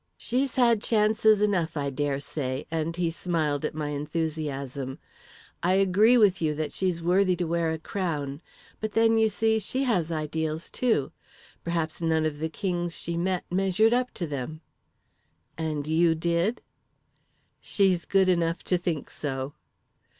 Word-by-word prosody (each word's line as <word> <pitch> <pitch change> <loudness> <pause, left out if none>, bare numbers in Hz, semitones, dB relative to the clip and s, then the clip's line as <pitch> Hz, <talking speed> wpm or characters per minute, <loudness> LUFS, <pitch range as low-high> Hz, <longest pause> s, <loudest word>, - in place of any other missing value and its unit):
"'She's 260 +2 -1
had 235 -4 +4
chances 215 -1 +3
enough, 175 -6 +1
I 140 -1 -1
dare 140 0 -1
say,' 135 -2 -4
and 165 0 -1
he 170 -1 0
smiled 160 -4 -1
at 150 - -2
my 150 -1 -2
enthusiasm. 145 -3 -3 0.6
'I 180 +2 +2
agree 195 +5 +5
with 200 -5 +4
you 155 -2 +1
that 155 0 -3
she's 180 -3 -1
worthy 185 +1 +3
to 175 - -2
wear 165 0 0
a 160 - -2
crown; 155 -5 -3 0.4
but 215 -1 -4
then, 225 0 +4
you 220 0 +4
see, 220 +1 +1
she 255 +6 -2
has 180 -11 +1
ideals, 155 0 -3
too. 225 - +1 0.5
Perhaps 165 -1 -2
none 160 -1 +2
of 150 -2 -2
the 160 +1 -2
kings 175 -1 -2
she 170 - -3
met 180 +1 0
measured 195 +4 +3
up 250 +1 +1
to 175 - -2
them.' 150 +1 -5 0.9
"'And 155 -2 -3
you 165 +1 +3
did?' 170 +7 0 1.0
"'She's 190 -4 +1
good 195 -1 +3
enough 170 -1 +1
to 180 - +1
think 170 -5 -2
so.' 135 -1 -3
170 Hz, 155 wpm, -27 LUFS, 155-195 Hz, 1.0 s, agree